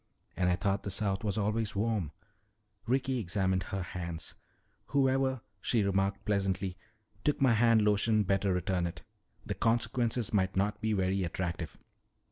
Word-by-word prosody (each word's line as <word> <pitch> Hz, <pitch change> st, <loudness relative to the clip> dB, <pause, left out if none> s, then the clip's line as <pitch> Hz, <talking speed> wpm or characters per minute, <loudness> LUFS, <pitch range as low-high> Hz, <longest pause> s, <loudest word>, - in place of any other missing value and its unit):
"And 90 Hz, -1 st, +2 dB
I 90 Hz, -, +3 dB
thought 95 Hz, +2 st, 0 dB
the -, -, -5 dB
South 95 Hz, 0 st, 0 dB
was 105 Hz, -2 st, 0 dB
always 110 Hz, +1 st, 0 dB
warm." 105 Hz, -6 st, 0 dB, 0.8 s
Ricky 130 Hz, +1 st, +1 dB
examined 95 Hz, -1 st, 0 dB
her 95 Hz, 0 st, -3 dB
hands. 85 Hz, -2 st, -5 dB, 0.5 s
"Whoever," 135 Hz, -2 st, +2 dB, 0.2 s
she 115 Hz, -1 st, +2 dB
remarked 100 Hz, 0 st, 0 dB
pleasantly, 95 Hz, -3 st, 0 dB, 0.5 s
"took 150 Hz, -, +1 dB
my 130 Hz, -3 st, +5 dB
hand 115 Hz, -1 st, +4 dB
lotion 105 Hz, +1 st, +3 dB
better 95 Hz, +1 st, +1 dB
return 90 Hz, 0 st, 0 dB
it. 85 Hz, -1 st, -8 dB, 0.4 s
The -, -, -2 dB
consequences 115 Hz, 0 st, 0 dB
might 95 Hz, -2 st, +2 dB
not 105 Hz, +2 st, 0 dB
be 110 Hz, 0 st, +1 dB
very 95 Hz, -1 st, +1 dB
attractive." 85 Hz, -2 st, -3 dB
100 Hz, 145 wpm, -31 LUFS, 95-115 Hz, 0.8 s, my